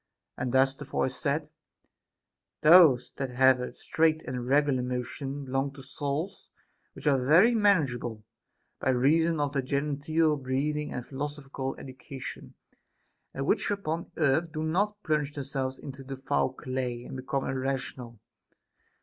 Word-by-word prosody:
And 125 - -3
thus 135 +1 +4
the 145 - -9
voice 130 -2 -1
said: 150 0 -1 1.1
Those 155 -6 +7
that 135 -1 -2
have 130 +1 +4
a 125 - -4
straight 160 0 +1
and 125 -1 -4
regular 140 -1 +3
motion 135 +3 -4
belong 135 +1 -1
to 135 -1 -11
souls 145 +7 -4 0.4
which - - -12
are 135 -3 +3
very 175 - +6
manageable, 135 - +1 0.6
by - - 0
reason 155 +6 +3
of 145 -1 0
their 140 - +1
genteel 150 +3 0
breeding 145 +3 -2
and 125 - -5
phil 135 - -9
osophical 140 -2 -4
education, 130 0 -9 0.8
and 135 - -4
which - - +1
upon 170 -5 -3
earth 155 +2 +2
do 155 0 -3
not 205 +6 0
plunge 150 -2 0
themselves 135 -2 -3
into 135 -1 -9
the 135 0 -7
foul 135 - 0
clay 125 -2 -4
and 135 - -8
become 135 +1 -2
irrational. 130 -3 -3
140 Hz, 140 wpm, -28 LUFS, 130-155 Hz, 1.1 s, Those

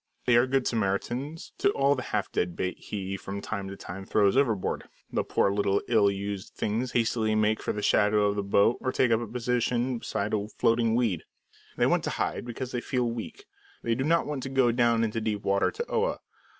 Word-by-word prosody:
They 120 -1 +4
are 120 +2 +5
good 135 0 +1
Samaritans 120 +8 -2
to - - +4
all 140 +1 +3
the 130 - -3
half - - -1
dead 90 -1 -1
bait 90 0 -2
he 100 -1 -4
from 100 +1 -6
time 100 -1 -4
to 100 0 -7
time 95 +2 -7
throws 100 +1 +2
overboard. 115 -8 0 0.2
The - - +1
poor 100 - +1
little 100 -1 +2
ill 110 -4 +4
used 100 0 -4
things 115 +4 -2
hastily 110 -2 +1
make 110 0 +2
for - - -1
the 105 - -4
shadow 105 0 +3
of 100 0 +1
the 100 - 0
boat 100 +3 +3
or 130 - 0
take 125 -2 +2
up 115 - +4
a 120 - -4
position 125 +1 0
beside 105 -1 -3
a 105 -1 0
floating 115 -1 +3
weed. 110 -9 +1 0.6
They - - +3
want - - +2
to - - -1
hide - - -2
because 125 +1 -5
they 120 - -2
feel 125 -2 -1
weak; 120 - -7 0.4
they 115 - +1
do 130 +3 -1
not 165 +3 +2
want 145 -3 -3
to 135 - -5
go 130 -3 +3
down 115 -1 +3
into 115 0 -1
deep 105 -2 -2
water 100 0 +2
to 470 - -4
Oa. 470 +2 0
115 Hz, 215 wpm, -28 LUFS, 100-125 Hz, 0.6 s, are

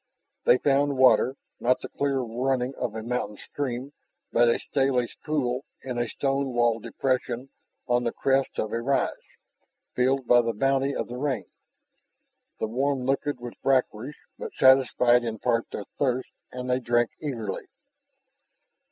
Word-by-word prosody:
They 125 - +6
found 140 0 +2
water, 130 0 +5 0.2
not 125 +1 +2
the - - -5
clear 140 -2 -1
running 125 +2 -1
of 120 -5 -4
a 110 - -4
mountain 115 -3 -3
spring, 135 +2 -4 0.4
but 120 0 +4
a - - +3
stalish 135 -3 0
pool 135 -4 -1 0.2
in 125 -2 -3
a 120 -1 -1
stone 135 -1 -1
walled 120 -2 +2
depression 130 +1 -2 0.4
on 120 -1 +2
the 120 - 0
crest 135 0 0
of 110 - -1
a 115 - -1
rise, 135 +3 +1 0.8
filled 130 +1 +2
by 120 0 +6
the 115 -1 -1
bounty 135 +4 +1
of - - -2
the 125 - -6
rain. 135 -7 -1 1.1
The 110 - -1
warm 130 +3 0
liquid 135 +1 0
was 120 0 -7
brackish, 130 0 +1 0.2
but - - -7
satisfied 125 -2 +5
in 115 -2 -3
part 115 +1 0
their 100 - -6
thirst, 130 -2 0 0.2
and 125 0 -5
they 125 0 +1
drank 120 -1 +1
eagerly. 115 -9 -4
125 Hz, 150 wpm, -26 LUFS, 120-135 Hz, 1.1 s, They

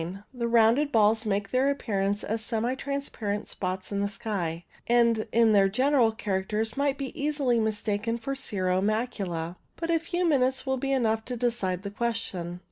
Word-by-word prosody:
The 240 -2 -2
rounded 235 +5 +4
balls 220 -1 +3
make 200 -1 -1
their 260 +2 +3
appear 225 -8 -1
ance 200 +2 0
as 220 +1 -2
semi 230 +2 -1
transparent 265 -7 -3
spots 185 +1 -4
upon 200 - -1
the 200 0 0
sky, 175 -6 -3 0.2
and 235 -2 +3
in 230 -1 +4
their 195 -2 +5
general 255 +1 +3
characters 215 +1 -2
might 280 0 0
easily 275 -2 0
be 220 - +1
mistaken 215 +1 -1
for 255 +4 -4
cirro 190 -8 -1
macula. 195 -6 -2 0.2
But 335 0 -2
a 330 - +3
few 350 +2 -2
minutes 265 -4 +2
will 265 0 0
be 275 +2 -2
enough 225 -4 +1
to 250 - -4
decide 215 -7 -1
the 200 - -5
question. 200 -6 -3
225 Hz, 175 wpm, -27 LUFS, 200-255 Hz, 0.2 s, their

